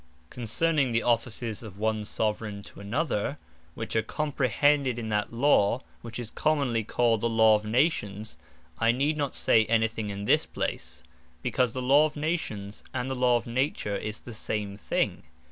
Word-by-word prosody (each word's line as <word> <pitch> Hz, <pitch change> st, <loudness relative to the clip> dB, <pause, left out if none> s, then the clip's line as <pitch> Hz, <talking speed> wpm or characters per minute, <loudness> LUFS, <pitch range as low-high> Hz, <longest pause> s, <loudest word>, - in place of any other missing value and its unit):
Concerning 135 Hz, +4 st, +1 dB
the 115 Hz, -, +2 dB
Offices 115 Hz, -1 st, -1 dB
of 105 Hz, -4 st, -10 dB
one 110 Hz, 0 st, 0 dB
Soveraign 105 Hz, -1 st, -2 dB
to -, -, -12 dB
another, 120 Hz, +4 st, -1 dB, 0.4 s
which 110 Hz, -, -4 dB
are 110 Hz, -, +4 dB
comprehended 140 Hz, -1 st, +1 dB
in 115 Hz, -2 st, -4 dB
that 105 Hz, -1 st, 0 dB
Law, 120 Hz, -2 st, +3 dB, 0.2 s
which 115 Hz, -1 st, -7 dB
is 120 Hz, -3 st, -6 dB
commonly 140 Hz, -7 st, +1 dB
called 115 Hz, 0 st, +1 dB
the 115 Hz, -, +1 dB
Law 110 Hz, -1 st, +5 dB
of 105 Hz, 0 st, +1 dB
Nations, 110 Hz, -4 st, 0 dB, 0.4 s
I 115 Hz, +1 st, +4 dB
need 140 Hz, +5 st, +1 dB
not 145 Hz, -3 st, -2 dB
say 110 Hz, -, +4 dB
any 110 Hz, 0 st, +3 dB
thing 110 Hz, -1 st, -5 dB
in 100 Hz, 0 st, -5 dB
this -, -, +3 dB
place; -, -, -4 dB, 0.4 s
because 125 Hz, -2 st, +1 dB
the 130 Hz, -, -3 dB
Law 140 Hz, +4 st, +6 dB
of 150 Hz, -, -12 dB
Nations, 125 Hz, -11 st, -3 dB
and 130 Hz, +1 st, -2 dB
the -, -, -1 dB
Law 125 Hz, -1 st, +4 dB
of 120 Hz, -, -6 dB
Nature, 120 Hz, -4 st, -1 dB
is 105 Hz, +2 st, -4 dB
the 120 Hz, -, -9 dB
same 105 Hz, -2 st, -3 dB
thing. 100 Hz, -, -1 dB
115 Hz, 175 wpm, -28 LUFS, 110-130 Hz, 0.4 s, Law